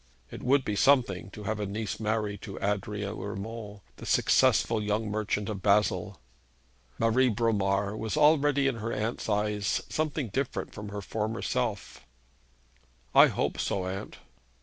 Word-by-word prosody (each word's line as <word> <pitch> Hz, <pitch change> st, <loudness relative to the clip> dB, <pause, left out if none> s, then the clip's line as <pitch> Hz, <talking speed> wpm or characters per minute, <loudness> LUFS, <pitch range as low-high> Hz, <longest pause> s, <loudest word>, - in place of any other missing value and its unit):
It -, -, -8 dB
would 135 Hz, +1 st, +2 dB
be 105 Hz, -, -1 dB
something 110 Hz, -6 st, +3 dB
to 105 Hz, +2 st, -10 dB
have 110 Hz, +1 st, -2 dB
a 105 Hz, -, -2 dB
niece 105 Hz, 0 st, -4 dB
married 105 Hz, -2 st, -1 dB
to 100 Hz, -3 st, -8 dB
Adrian 105 Hz, +1 st, -2 dB
Urmand, 105 Hz, +1 st, -6 dB, 0.2 s
the -, -, -9 dB
successful 115 Hz, -2 st, +3 dB
young 105 Hz, +1 st, -1 dB
merchant 105 Hz, -1 st, -1 dB
of 100 Hz, -3 st, -4 dB
Basle. 105 Hz, -8 st, +2 dB, 0.8 s
Marie 120 Hz, +3 st, +3 dB
Bromar 100 Hz, -3 st, +1 dB
was 110 Hz, +5 st, -3 dB
already 145 Hz, -2 st, +4 dB
in 135 Hz, -3 st, +1 dB
her 115 Hz, +1 st, -3 dB
aunt's 110 Hz, +1 st, -3 dB
eyes 105 Hz, -2 st, 0 dB
something 155 Hz, -5 st, -1 dB
different 130 Hz, +6 st, -3 dB
from 105 Hz, -1 st, -7 dB
her 100 Hz, 0 st, -5 dB
former 110 Hz, +2 st, -3 dB
self. -, -, -2 dB, 1.1 s
'I -, -, +8 dB
hope -, -, -2 dB
so, 95 Hz, -2 st, -1 dB
aunt.' 95 Hz, +1 st, -5 dB
105 Hz, 150 wpm, -28 LUFS, 100-115 Hz, 1.1 s, I